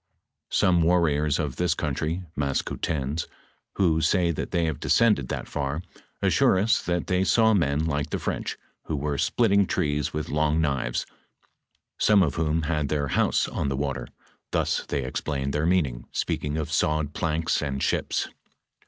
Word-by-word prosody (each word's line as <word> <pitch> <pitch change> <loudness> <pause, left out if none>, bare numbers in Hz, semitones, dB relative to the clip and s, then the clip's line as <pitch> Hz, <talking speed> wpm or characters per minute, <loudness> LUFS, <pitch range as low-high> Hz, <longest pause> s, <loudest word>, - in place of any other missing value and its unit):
Some 90 -2 +3
warriore 80 -3 +2
of 70 -4 -3
this 90 -2 +1
country 80 +4 -2
(Maskoutens), 70 +1 -2 0.5
who 80 -5 +2
say 85 +1 +2
that 80 - -4
they 85 -1 +1
have 80 -2 -2
descended 80 - +3
that - - -4
far, 70 +3 -3 0.4
assure - - +4
us 110 +4 +2
that 85 -1 -1
they 90 0 +1
saw 110 +2 +4
men 80 -5 +1
like 75 -1 -1
the - - -1
French, - - -3 0.3
who 80 - -2
were 70 -1 -2
splitting 100 -5 +3
trees 75 -5 0
with 75 0 -4
long 75 +1 +1
knives, 70 -6 0 0.9
some 105 -3 +5
of 75 - 0
whom 80 0 0
had 75 -2 -1
their 70 -2 -1
house - - +2
on 70 - -2
the 70 - -2
water, 70 -1 -2 0.4
ihus - - 0
they 70 - -1
explained 70 +1 -3
their 75 +2 0
meaning, 70 -10 0
speaking 75 +1 -2
of 80 0 -3
sawed 75 0 +1
planks 80 -1 0
and 70 -2 -2
ships. - - 0
75 Hz, 160 wpm, -26 LUFS, 70-85 Hz, 0.9 s, some